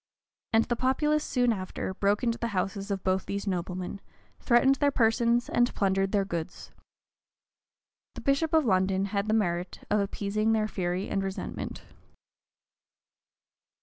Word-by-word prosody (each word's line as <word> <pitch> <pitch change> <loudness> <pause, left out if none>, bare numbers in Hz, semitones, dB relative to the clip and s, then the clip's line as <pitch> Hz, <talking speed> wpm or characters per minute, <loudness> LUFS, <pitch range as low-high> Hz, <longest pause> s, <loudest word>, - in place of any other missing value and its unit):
[] - - -66
And 225 0 +4
the 240 - -1
populace, 300 +5 +1
soon 245 -4 +2
after, 190 -1 -4
broke 200 +3 +1
into 235 -1 0
the 235 - -1
houses 195 +2 -2
of 195 -2 -2
both 190 0 0
these 200 +1 -3
noblemen, 185 0 -3 0.4
threatened 265 +2 +4
their 285 - +3
persons, 235 -1 +2
and 240 0 +2
plundered 195 -1 +1
their 200 -2 +2
goods. 170 -2 -5 1.4
The - - -7
bishop 280 +3 +1
of 315 -3 +4
London 190 -1 +2
had 200 +1 0
the 215 - +2
merit 175 -4 -1
of 210 - +3
appeasing 205 +2 0
their 215 -1 +1
fury 180 -2 -2
and 195 - -1
resentment. 195 0 -5
205 Hz, 150 wpm, -28 LUFS, 190-240 Hz, 1.4 s, And